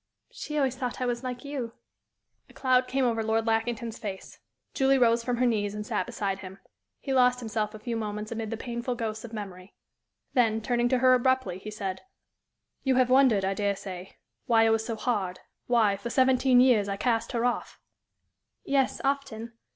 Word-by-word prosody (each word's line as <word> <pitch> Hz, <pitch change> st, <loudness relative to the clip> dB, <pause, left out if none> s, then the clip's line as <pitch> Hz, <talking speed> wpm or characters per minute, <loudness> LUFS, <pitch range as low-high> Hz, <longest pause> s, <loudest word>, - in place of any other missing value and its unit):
"She 300 Hz, -, -5 dB
always 265 Hz, -3 st, +1 dB
thought 250 Hz, -2 st, -4 dB
I 255 Hz, -, -1 dB
was 240 Hz, 0 st, -2 dB
like 250 Hz, +1 st, -5 dB
you." 265 Hz, -5 st, -4 dB, 0.8 s
A -, -, -17 dB
cloud 255 Hz, -1 st, +2 dB
came 265 Hz, 0 st, +1 dB
over 230 Hz, -2 st, +1 dB
Lord 220 Hz, 0 st, 0 dB
Lackington's 225 Hz, 0 st, -1 dB
face. 195 Hz, -3 st, -7 dB, 0.3 s
Julie 270 Hz, 0 st, +3 dB
rose 235 Hz, -2 st, +3 dB
from 245 Hz, 0 st, -1 dB
her 250 Hz, -, +2 dB
knees 210 Hz, -4 st, 0 dB
and 210 Hz, 0 st, -5 dB
sat -, -, -2 dB
beside 200 Hz, -5 st, -3 dB
him. 190 Hz, 0 st, -9 dB, 0.4 s
He 270 Hz, -, -3 dB
lost 250 Hz, -1 st, +4 dB
himself 220 Hz, -2 st, -3 dB
a -, -, -9 dB
few 235 Hz, +1 st, -4 dB
moments 210 Hz, -1 st, -4 dB
amid 225 Hz, -1 st, -4 dB
the 225 Hz, -, -4 dB
painful 240 Hz, +1 st, -4 dB
ghosts 220 Hz, -2 st, -4 dB
of 235 Hz, -, -8 dB
memory. 195 Hz, -3 st, -8 dB, 0.6 s
Then, 225 Hz, -4 st, +3 dB
turning 240 Hz, +1 st, 0 dB
to 255 Hz, -, +3 dB
her 255 Hz, +1 st, +5 dB
abruptly, 255 Hz, -7 st, +1 dB
he 210 Hz, -, -8 dB
said: 195 Hz, -3 st, -4 dB, 0.8 s
"You 265 Hz, -2 st, +1 dB
have 255 Hz, 0 st, +3 dB
wondered, 255 Hz, -7 st, +5 dB
I 195 Hz, -, 0 dB
dare 200 Hz, 0 st, 0 dB
say, 185 Hz, -1 st, -9 dB, 0.3 s
why 225 Hz, -2 st, +5 dB
I 225 Hz, -, +4 dB
was 225 Hz, 0 st, +2 dB
so 230 Hz, 0 st, -3 dB
hard 205 Hz, -6 st, -2 dB, 0.3 s
why, 220 Hz, -5 st, +3 dB
for 200 Hz, +4 st, -6 dB
seventeen 255 Hz, 0 st, +4 dB
years, 230 Hz, -6 st, +4 dB
I 200 Hz, -, -2 dB
cast 230 Hz, +2 st, 0 dB
her 235 Hz, 0 st, 0 dB
off?" 245 Hz, -1 st, -2 dB, 0.9 s
"Yes, 275 Hz, -1 st, +1 dB
often. 270 Hz, -5 st, -2 dB
230 Hz, 190 wpm, -27 LUFS, 215-255 Hz, 0.9 s, her